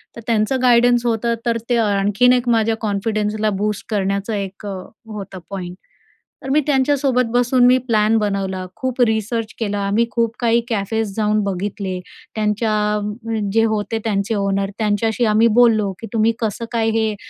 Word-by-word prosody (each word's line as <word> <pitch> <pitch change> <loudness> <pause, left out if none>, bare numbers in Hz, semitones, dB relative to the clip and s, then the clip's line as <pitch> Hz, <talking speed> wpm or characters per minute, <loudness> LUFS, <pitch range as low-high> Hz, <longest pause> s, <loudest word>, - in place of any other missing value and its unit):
तर 230 - -8
त्यांचं 230 +3 +1
गाईडन्स 240 0 +4
होतं 235 0 0
तर 235 -1 +1
ते 240 - +2
आणखीन 210 +3 +3
एक 245 -1 0
माझ्या 225 -1 +2
कॉन्फिडन्सला 215 0 -1
बूस्ट 210 -1 -2
करण्याचं 200 0 -1
एक 200 0 -5
होतं 200 0 -8
पॉइंट. 180 -2 -6 0.7
तर 265 - -5
मी 285 +3 +3
त्यांच्यासोबत 265 -2 +2
बसून 245 +1 +3
मी 250 +1 +6
प्लॅन 220 0 +3
बनवला, 195 -3 -2
खूप 260 -1 -2
रिसर्च 220 +1 -2
केला. 205 -3 -2
आम्ही 220 +4 +2
खूप 230 -1 0
काही 235 -1 +2
कॅफेस 220 -1 -1
जाऊन 215 -1 +1
बघितले 195 -1 -3 0.4
त्यांच्या 210 +1 -1
जे 225 0 +4
होते 220 +1 -1
त्यांचे 205 0 0
ओनर 195 -1 0
त्यांच्याशी 220 +2 +1
आम्ही 215 +1 +4
बोललो 220 -4 +4
की 225 - -6
तुम्ही 225 0 +2
कसं 225 0 -2
काय 225 -2 +1
हे 220 -1 0
220 Hz, 155 wpm, -19 LUFS, 205-235 Hz, 0.7 s, मी